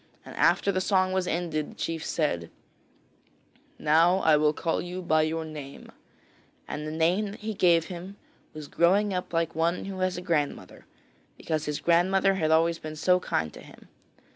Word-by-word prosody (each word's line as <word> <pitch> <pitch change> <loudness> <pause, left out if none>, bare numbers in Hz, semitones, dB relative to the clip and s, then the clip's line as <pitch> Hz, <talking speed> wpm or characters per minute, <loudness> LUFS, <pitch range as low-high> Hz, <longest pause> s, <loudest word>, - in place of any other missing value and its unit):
And - - -10
after 200 - +3
the 185 -1 -1
song 185 -1 +1
was 185 -1 0
ended 160 -3 -2
the - - -14
chief 165 -1 -4
said: 85 - -1 1.3
'Now 165 +4 +4
I 155 - +5
will 150 0 +3
call 165 +2 -2
you 180 +1 -6
by 155 -2 +3
your 160 +1 -1
name,' 150 -3 -9 0.8
and 150 +1 -5
the - - -4
name 170 +6 +1
that 205 - -10
he 220 +1 -3
gave 170 -4 +3
him 185 +2 -8 0.4
was 155 -1 -9
Growing 195 +6 +2
up 180 -1 -4
like 165 -1 -1
one 165 +2 0
who 195 -1 -6
has 185 -1 0
a - - -5
grandmother, 150 -5 -3 0.5
because 155 -2 -3
his 150 -1 -3
grandmother 190 +3 +3
had 160 -5 0
always 165 +1 +3
been 155 0 -7
so 180 +4 +3
kind 80 - -2
to - - -11
him. - - -16
170 Hz, 180 wpm, -27 LUFS, 155-185 Hz, 1.3 s, I